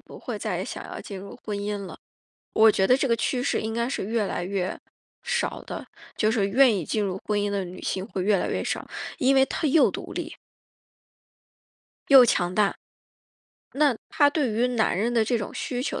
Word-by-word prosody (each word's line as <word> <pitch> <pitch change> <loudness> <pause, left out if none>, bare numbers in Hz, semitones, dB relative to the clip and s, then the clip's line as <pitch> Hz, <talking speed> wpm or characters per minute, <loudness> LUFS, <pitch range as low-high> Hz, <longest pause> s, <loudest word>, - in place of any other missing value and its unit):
不 - - -13
会 - - -5
再 - - -2
想 - - -6
要 - - -7
进 195 -2 -8
入 200 +5 -10
婚 210 -2 -3
姻 205 +1 -3
了， - - -9 0.6
我 220 0 +6
觉 190 -1 +1
得 255 - +6
这 270 - 0
个 230 - +3
趋 245 +3 -1
势 - - 0
应 220 0 -3
该 235 +1 0
是 270 - -3
越 225 0 0
来 180 -2 -3
越 190 -1 -2 0.4
少 480 0 -1
的， - - -7 0.3
就 215 0 +2
是 205 -4 +1
愿 250 +2 +5
意 175 -6 -3
进 215 -2 -1
入 190 -1 -3
婚 210 -1 0
姻 205 0 0
的 200 -2 -2
女 180 +1 -9
性 190 0 -2
会 185 -4 -3
越 205 -1 +3
来 - - -1
越 - - -2
少， - - -3 0.3
因 270 +1 +3
为 265 0 +5
她 305 - -2
又 300 +3 +4
独 - - -7
立 - - -5 1.7
又 270 -3 +9
强 180 -5 +1
大。 205 -2 +2 1.0
那 280 -4 +3
她 290 -2 +4
对 285 -5 0
于 235 +4 +1
男 230 -6 +1
人 230 +5 0
的 225 -2 +3
这 240 +1 +1
种 205 - -5
需 250 -1 -3
求 - - -3
220 Hz, 230 characters per minute, -25 LUFS, 200-255 Hz, 1.7 s, 又